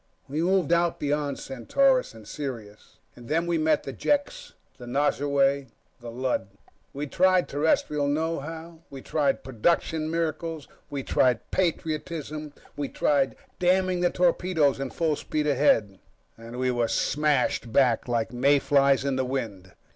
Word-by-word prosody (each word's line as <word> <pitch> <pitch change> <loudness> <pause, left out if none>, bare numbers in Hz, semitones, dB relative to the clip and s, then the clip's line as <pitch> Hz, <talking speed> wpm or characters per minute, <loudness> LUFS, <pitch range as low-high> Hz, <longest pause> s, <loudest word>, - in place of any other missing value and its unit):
We 145 +4 -2
moved 180 -2 +2
out 170 0 +1
beyond 145 -1 -1
Centaurus, 255 - +1
and 110 -2 -13
Sirius, 115 -7 -7 0.2
and 120 -1 -13
then 165 +2 +1
we 170 -1 0
met 155 -1 +2
the 135 - -6
Jeks, 390 - -1 0.3
the 120 - -9
Nosurwey, 140 0 +1 0.3
the 120 - -8
Lud. 125 -4 -2 0.4
We 145 +2 -4
tried 185 +4 +3
Terrestrial 145 0 +1
know 160 +3 0
how, 160 +3 -8
we 135 -1 -10
tried 145 -3 0
Production 155 +5 0
Miracles, 165 -1 -3 0.2
we 140 -2 -4
tried 125 -3 +1
patriotism, 155 -3 -2 0.2
we 145 -1 -3
tried 140 -2 +1 0.2
damning 185 0 +2
the 175 - +3
torpedoes 175 -6 +1
and 135 -1 -4
full 160 -3 0
speed 150 +1 -3
ahead... 110 -9 +2 0.4
and 115 +2 -10
we 130 0 +1
were 120 -1 0
smashed 145 -4 0
back 125 -2 +3
like 115 -1 -1
mayflies 140 +1 +3
in 135 -1 0
the 130 - +1
wind. 110 -8 -4
145 Hz, 145 wpm, -26 LUFS, 130-165 Hz, 0.4 s, tried